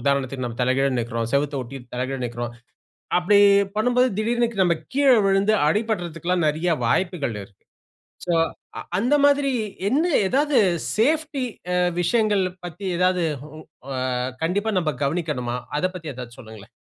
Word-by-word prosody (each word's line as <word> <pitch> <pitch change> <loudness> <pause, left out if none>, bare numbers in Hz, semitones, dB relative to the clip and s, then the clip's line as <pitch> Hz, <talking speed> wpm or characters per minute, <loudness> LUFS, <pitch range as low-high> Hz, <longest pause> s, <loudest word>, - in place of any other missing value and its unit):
உதாரணத்திற்கு, 135 -1 -1
நம்ம 115 -1 -7
தலைகீழா 130 +2 +2
நிற்கிறோம். 115 -1 -3
செவுத்த 145 +1 +1
ஒட்டி 125 +3 -8 0.2
தலை 125 +1 -1
கீழா 135 -1 -4
நிற்கிறோம். 120 0 -5 0.6
அப்படி 200 +3 +4 0.4
பண்ணும்போது 245 +3 +3
திடீர்னு 235 +2 +1
க - - -13
நம்ம 175 -2 +2 0.2
கீழ 280 0 +4 0.2
விழுந்து 195 +2 +3
அடிபடுறதுக்கெல்லாம் 175 -3 0
நிறையா 160 +4 0
வாய்ப்புகள் 170 - 0
இருக்கு. 100 0 -17 0.7
ஸோ 175 - 0 0.5
அ - - -3 0.2
அந்த 245 +8 +2
மாதிரி 285 -1 +4 0.4
என்ன 285 +9 +2 0.2
எதாவது 285 +3 +2 0.4
சேஃப்டி 295 +4 +1 0.3
அ - - +2 0.2
விஷயங்கள 210 +2 +2 0.2
பத்தி 175 +3 -8
எதாவது 180 0 +2 0.2
வு 155 +1 -11 0.4
அ - - -2 0.5
கண்டிப்பா 205 +6 0
நம்ம 160 -4 0
கவனிக்கணுமா? 140 -6 -2 0.2
அத 180 - +1
பத்தி 165 -4 -6
எதாச்சும் 120 -1 -9
சொல்லுங்களேன். 110 -3 -12
175 Hz, 145 wpm, -23 LUFS, 135-215 Hz, 0.7 s, அப்படி